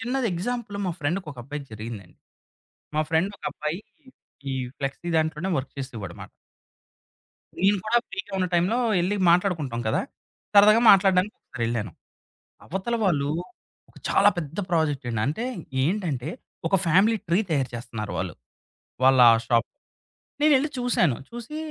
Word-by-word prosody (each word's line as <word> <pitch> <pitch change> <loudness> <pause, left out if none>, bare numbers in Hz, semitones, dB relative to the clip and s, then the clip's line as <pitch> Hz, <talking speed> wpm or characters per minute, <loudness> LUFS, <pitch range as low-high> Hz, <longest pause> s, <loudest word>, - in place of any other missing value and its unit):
చిన్నది 250 +2 -1
ఎగ్జాంపుల్ 215 +3 -3
మా 180 - -1
ఫ్రెండ్‌కి 175 +5 -1
ఒక 130 - -16
అబ్బాయికి 140 +2 -7
జరిగిందండి. 110 -4 -8 0.8
మా 155 - +3
ఫ్రెండ్ 165 +4 +2
ఒక - - -17
అబ్బాయి, 155 +5 -4 0.7
ఈ - - -1 0.2
ఫ్లెక్సీ 140 +5 -4
దాంట్లోనే 160 +3 -1
వర్క్ 130 0 -5
చేసేవాడమాట. 110 -10 -7 1.3
నేను 200 +3 +3
కూడా 235 +2 +4
ఫ్రీ‌గా 195 +1 -6
ఉన్న 185 - +1
టైంలో 185 +8 +2 0.2
ఎళ్లి 185 +4 0
మాట్లాడుకుంటాం 165 -9 +1
కదా! - - +1 0.5
సరదాగా 210 +2 +7
మాట్లాడడానికి 190 +1 +4
ఒకసారెళ్ళాను. 115 -5 -3 0.7
అవతల 190 +7 -2
వాళ్ళు 145 -6 +1 0.8
చాలా 200 - +5
పెద్ద 160 -1 -5
ప్రాజెక్ట్ 155 -6 0
అండి. 115 -2 -2
అంటే 150 - -2 0.4
ఏంటంటే 155 - -1 0.4
ఒక 195 - +3
ఫ్యామిలీ 195 +7 +4
ట్రీ 170 +3 +3
తయారు 140 -5 0
చేస్తున్నారు 115 -3 -6
వాళ్ళు. - - -3 0.7
వాళ్ళ 130 -1 +6 0.2
షాప్ 115 -1 +2 0.7
నేనెళ్లి 295 -1 +4
చూసాను. 240 - +2
చూసి 240 +6 -7
170 Hz, 125 wpm, -25 LUFS, 135-200 Hz, 1.3 s, సరదాగా